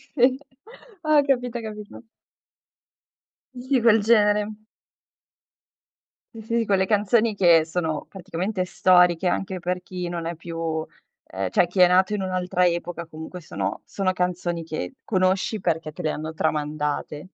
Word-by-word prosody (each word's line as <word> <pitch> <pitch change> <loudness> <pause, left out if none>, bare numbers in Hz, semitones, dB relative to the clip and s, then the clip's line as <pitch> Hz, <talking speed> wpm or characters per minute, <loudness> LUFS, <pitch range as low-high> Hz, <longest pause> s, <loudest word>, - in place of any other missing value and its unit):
Sì, 255 0 +4 0.6
ah, 305 -2 +4
capita, 250 -3 0
capito. 215 +1 -9 1.5
Di 255 +1 0
quel 225 -2 +5
genere. 210 -1 +3 1.9
Sì, - - -7
sì, 230 +2 -2
sì, 225 - 0
quelle 190 -2 +2
canzoni 215 +2 +2
che 170 -5 +5
sono, 160 -2 -3
praticamente, 185 +1 -3
storiche, 180 -1 +4
anche 190 +1 -2
per 180 +1 -2
chi 180 -1 -5
non 170 -1 -4
è 170 0 -3
più 165 -1 -4 0.4
ehm, 95 -1 -3
cioè, 175 - +3
chi 185 +2 -4
è 180 - +8
nato 185 +3 +3
in 205 - -1
un'altra 180 -1 0
epoca, 170 0 -3
comunque, 160 +3 -9
sono 160 - -4
sono 195 -2 -1
canzoni 180 -2 -2
che 155 - -5
conosci, 190 +2 +1
perché 160 -3 -1
te 180 - -7
le 155 - 0
hanno 155 +1 -5
tramandate. 150 -1 -2
180 Hz, 140 wpm, -24 LUFS, 165-210 Hz, 1.9 s, è